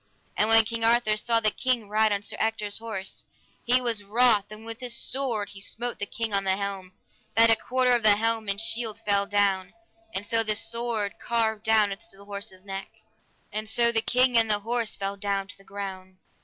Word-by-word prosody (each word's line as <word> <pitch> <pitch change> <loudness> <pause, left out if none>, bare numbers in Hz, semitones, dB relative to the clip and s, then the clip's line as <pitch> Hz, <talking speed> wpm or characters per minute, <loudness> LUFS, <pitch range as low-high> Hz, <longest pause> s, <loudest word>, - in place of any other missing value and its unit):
And 215 - +2
when 225 0 +7
King 230 0 -2
Arthur 230 -2 +3
saw 230 +2 +2
the 215 -1 +3
king 245 -3 -1
ride 215 +1 +2
on 200 0 -1
Sir - - -5
Ector's 220 -2 -1
horse, 215 -4 -4 0.4
he 250 +2 +4
was 230 -4 0
wroth 215 0 +3
and 215 +1 -9
with 230 0 -6
his 245 -2 -3
sword 240 -6 -2
he 195 - -9
smote 240 +4 -3
the 205 - -3
king 225 -2 -4
on 195 0 +2
the 190 -1 +2
helm, 195 -2 -5 0.4
that 230 0 +7
a - - +6
quarter 250 +2 +1
of 240 -1 +4
the 215 -2 +6
helm 225 0 0
and 200 0 -1
shield 225 -1 0
fell 200 -1 +2
down, 195 -2 0 0.4
and 200 - -2
so 225 +1 +3
the 215 -1 +2
sword 225 -2 -1
carved 220 -2 0
down 215 -2 +3
unto 205 +3 -7
the 200 - -14
horse's 200 -2 -7
neck, 195 0 -6 0.6
and 215 +1 -3
so 235 +1 +3
the 225 -1 +1
king 250 +2 +2
and 225 -1 +1
the 205 -1 +1
horse 230 0 -2
fell 200 0 -4
down 200 -1 -2
to - - -8
the - - -17
ground. 190 -2 -8
215 Hz, 210 wpm, -26 LUFS, 200-230 Hz, 0.6 s, when